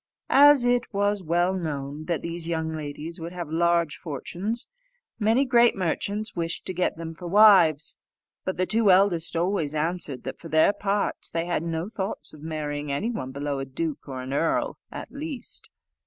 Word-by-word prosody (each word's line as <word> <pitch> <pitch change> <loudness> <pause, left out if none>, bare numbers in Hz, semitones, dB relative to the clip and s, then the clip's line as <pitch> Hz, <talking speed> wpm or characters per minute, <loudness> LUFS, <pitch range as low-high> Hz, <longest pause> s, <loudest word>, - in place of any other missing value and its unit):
As 285 -2 +7
it 245 0 +1
was 205 0 0
well 175 +2 +1
known 150 -4 -4
that 170 -2 -2
these 170 0 -4
young 160 -1 -1
ladies 155 +2 -6
would 170 +2 -6
have 175 -4 -6
large 170 -1 +2
fortunes, 185 - -4 0.5
many 225 +5 +3
great 240 -2 +4
merchants 200 +4 -2
wished 170 -1 -3
to 185 - -3
get 180 -2 -1
them 165 0 -6
for 175 +2 -8
wives; 175 -7 +5 0.4
but 185 - -3
the 185 - +1
two 215 +2 +4
eldest 185 -3 +4
always 165 -3 0
answered, 155 -4 -2
that, - - -6
for 165 - -10
their 160 +6 +4
parts, 205 0 -1
they 165 0 -2
had 175 -3 -1
no 165 +1 -3
thoughts 200 -2 -4
of 155 - -13
marrying 150 -2 -4
any 200 +12 -1
one 130 - -4
below 140 0 -3
a 135 - -3
duke 150 +3 -4
or 130 -2 -5
an 130 +1 -5
earl 165 +3 0
at - - -8
least. 285 -2 -5
170 Hz, 180 wpm, -25 LUFS, 155-200 Hz, 0.5 s, As